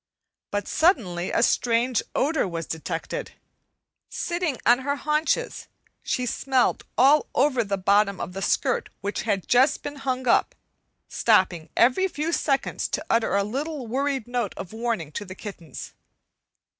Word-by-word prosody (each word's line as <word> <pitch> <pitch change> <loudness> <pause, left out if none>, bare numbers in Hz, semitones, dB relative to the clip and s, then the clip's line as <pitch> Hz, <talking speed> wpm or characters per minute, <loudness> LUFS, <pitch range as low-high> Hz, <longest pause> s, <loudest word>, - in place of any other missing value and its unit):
But 205 0 -2
suddenly 190 - +2
a 230 - +2
strange 240 0 +2
odor 290 -4 +1
was 165 -2 -4
detected. 165 - -5 0.8
Sitting 345 -6 -2
on 240 +2 +6
her 285 +2 -1
haunches 305 - -1 0.3
she 250 - -1
smelled 260 +1 +1
all 280 +5 +5
over 260 -3 +3
the 200 -1 -2
bottom 200 +1 +2
of 180 - -5
the 195 - -5
skirt - - 0
which 200 +1 -2
had 195 -3 0
just 255 +4 +3
been 290 0 -6
hung 260 -2 -2
up, - - +3 0.5
stopping 185 -7 +2
every 255 +11 +4
few 320 -2 -3
seconds 275 -4 0
to - - -3
utter 230 -3 +2
a 200 - +3
little 275 +6 -4
worried 265 +1 -1
note 245 -5 -2
of 185 - -7
warning 225 -9 -2
to 205 - -4
the 185 -1 -9
kittens. 175 - -9
240 Hz, 145 wpm, -25 LUFS, 200-280 Hz, 0.8 s, on